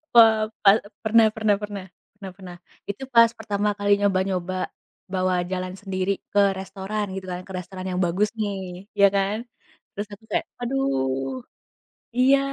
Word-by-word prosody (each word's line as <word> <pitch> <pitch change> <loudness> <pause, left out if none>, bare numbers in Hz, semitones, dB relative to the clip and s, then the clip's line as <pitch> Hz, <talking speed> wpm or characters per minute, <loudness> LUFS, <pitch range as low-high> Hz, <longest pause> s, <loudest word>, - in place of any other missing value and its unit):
Pe - - +10 0.4
pa 200 - +8 0.3
pernah 220 0 +6
pernah 215 -2 +3
pernah. 205 -2 -5 0.3
Pernah 195 -3 -8
pernah. 185 -2 -10 0.3
Itu 205 +7 -4
pas 230 0 +7
pertama 210 -1 0
kali 205 0 +4
nyoba-nyoba, 185 -2 0 0.5
bawa 185 -1 +1 0.2
jalan 185 0 -2
sendiri, 190 -1 -1 0.2
ke 200 -1 +5
restoran, 200 +2 -3
gitu 190 -1 -5
kan. 180 0 -4
Ke 190 - -9
restoran 185 +1 -6
yang 185 0 -1
bagus 195 +5 +1
nih, 195 -2 -4
ya 200 0 +8
kan. 205 +5 0 0.5
Terus 205 +1 -3
aku 205 - -19
kayak, - - 0 0.2
aduh! 135 - -1 0.8
Iya. 265 +2 +6
195 Hz, 150 wpm, -24 LUFS, 185-210 Hz, 0.8 s, Pe